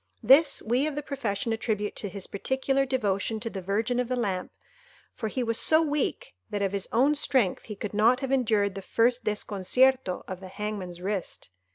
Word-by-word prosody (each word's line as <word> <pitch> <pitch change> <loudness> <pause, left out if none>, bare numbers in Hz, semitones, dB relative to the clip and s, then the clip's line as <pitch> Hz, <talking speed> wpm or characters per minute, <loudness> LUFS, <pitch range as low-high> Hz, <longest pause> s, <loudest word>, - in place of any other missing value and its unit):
This 275 +6 +5
we 250 +6 +1
of 305 - -4
the 295 - -3
profession 230 -6 -2
attribute 215 -2 -2
to 205 - -4
his 190 0 -5
particular 265 +5 -1
devotion 220 -4 -1
to 230 - -4
the 190 - -5
Virgin 220 +6 -1
of 250 - 0
the 255 - -1
Lamp, 195 -7 -2 0.6
for 220 - -4
he 250 +4 -2
was 230 -1 +1
so 315 - +5
weak, 295 - -2 0.2
that, 205 -1 -2
of 195 - 0
his 200 -1 -1
own 270 +5 +4
strength, 260 -9 +1
he 210 - -7
could 205 +1 -6
not 230 +5 +3
have 270 -1 -3
endured 215 -6 +2
the 195 - -6
first 240 +5 +1
desconcierto 210 +2 +1
of 185 -1 -6
the 190 - -9
hangman's 190 -3 -5
wrist. 190 - -4
220 Hz, 195 wpm, -27 LUFS, 200-260 Hz, 0.6 s, This